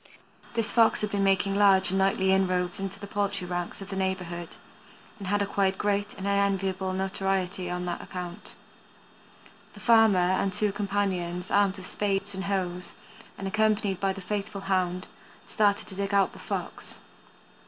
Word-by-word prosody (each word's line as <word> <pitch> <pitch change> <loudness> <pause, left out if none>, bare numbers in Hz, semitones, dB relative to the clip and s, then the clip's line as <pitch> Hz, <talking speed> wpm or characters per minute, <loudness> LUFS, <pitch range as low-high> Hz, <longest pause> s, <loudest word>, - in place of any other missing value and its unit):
This 230 -2 0
Fox 230 -2 +4
had 210 -1 -2
been 200 -1 +1
making 195 0 +2
large 195 -2 +5
and 190 - +1
nightly 190 0 +3
inroads 185 -2 +1
into 195 0 -4
the 205 - -7
poultry 200 -2 -2
ranks 175 +1 -4
of 195 - -12
the - - -3
neighborhood, 180 -3 -2 0.7
and 195 - -6
had 205 +1 +2
acquired 195 -1 +1
great 205 0 0
and 195 - -6
unenviable 195 -1 +1
notoriety 190 -1 -1
on 180 0 -3
that 175 -1 -3
account. 180 +2 -6 1.2
The - - -11
farmer 225 -4 +5
and 185 +2 +2
two 210 +2 +1
companions, 190 -3 -2
armed 200 -1 +3
with 185 -1 -9
spades 200 0 -1
and 190 0 -4
hoes, 180 -2 -2 0.4
and 195 - -4
accompanied 210 -2 +1
by 195 -1 +1
the 195 0 -6
faithful 205 +1 -3
hound, 185 -1 0 0.4
started 205 -2 +2
to - - -10
dig 200 +1 -2
out 195 -1 +3
the - - -12
Fox. - - -5
195 Hz, 165 wpm, -27 LUFS, 185-200 Hz, 1.2 s, large